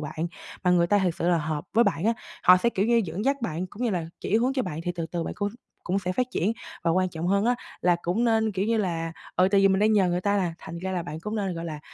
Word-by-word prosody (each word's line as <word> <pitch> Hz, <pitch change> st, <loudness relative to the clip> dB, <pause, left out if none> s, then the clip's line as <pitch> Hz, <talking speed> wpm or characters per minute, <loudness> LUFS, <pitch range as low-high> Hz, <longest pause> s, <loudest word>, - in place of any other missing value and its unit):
bạn 155 Hz, +2 st, -3 dB, 0.4 s
mà 180 Hz, -, +4 dB
người 170 Hz, -1 st, +4 dB
ta 205 Hz, +3 st, +3 dB
thiệt 180 Hz, -3 st, +1 dB
sự 170 Hz, -, +1 dB
là 175 Hz, -1 st, +3 dB
hợp 155 Hz, -1 st, -3 dB
với 235 Hz, +1 st, +5 dB
bạn 160 Hz, +5 st, 0 dB
á. 230 Hz, -, +4 dB, 0.3 s
Họ 180 Hz, 0 st, +8 dB
sẽ, 235 Hz, +6 st, +2 dB
kiểu 200 Hz, +1 st, 0 dB
như, 235 Hz, 0 st, +4 dB
dẫn 185 Hz, +6 st, -4 dB
dắt 275 Hz, +1 st, +2 dB
bạn 180 Hz, -4 st, -2 dB
cũng 205 Hz, +6 st, -8 dB
như 240 Hz, -, +1 dB
là 175 Hz, -4 st, -2 dB
chỉ 215 Hz, -, +1 dB
hướng 250 Hz, +3 st, +2 dB
cho 265 Hz, -2 st, 0 dB
bạn 155 Hz, -5 st, -4 dB
thì 175 Hz, -, -1 dB
từ 165 Hz, -2 st, -3 dB
từ 170 Hz, -1 st, -1 dB
bạn -, -, -4 dB
cũng 205 Hz, -1 st, -1 dB, 0.4 s
cũng 190 Hz, +2 st, 0 dB
sẽ 180 Hz, -1 st, -2 dB
phát 250 Hz, +5 st, 0 dB
triển. 210 Hz, -2 st, 0 dB, 0.3 s
Và 170 Hz, -, +3 dB
quan 185 Hz, +2 st, +2 dB
trọng 165 Hz, 0 st, -4 dB
hơn 200 Hz, +3 st, +2 dB
á, 245 Hz, -, +3 dB, 0.3 s
là 175 Hz, -1 st, +3 dB
cũng 195 Hz, +8 st, 0 dB
nên, 220 Hz, -2 st, +2 dB
kiểu 195 Hz, +1 st, -1 dB
như 230 Hz, 0 st, +2 dB
là 165 Hz, -5 st, -1 dB, 0.2 s
ừ, 185 Hz, +1 st, +5 dB
tại 200 Hz, -1 st, +4 dB
vì 195 Hz, -, +6 dB
mình 190 Hz, -, +2 dB
đang 215 Hz, +1 st, +4 dB
nhờ 195 Hz, -4 st, +4 dB
người 175 Hz, +1 st, 0 dB
ta 205 Hz, +1 st, +1 dB
là 180 Hz, -4 st, 0 dB
thành 170 Hz, +1 st, -8 dB
ra 190 Hz, +2 st, -3 dB
là 180 Hz, -2 st, -1 dB
bạn 160 Hz, -1 st, -7 dB
cũng 210 Hz, +4 st, -4 dB
nên, 195 Hz, -3 st, -1 dB
gọi 165 Hz, 0 st, -5 dB
là, 155 Hz, -3 st, -5 dB
185 Hz, 310 wpm, -26 LUFS, 170-210 Hz, 0.4 s, Họ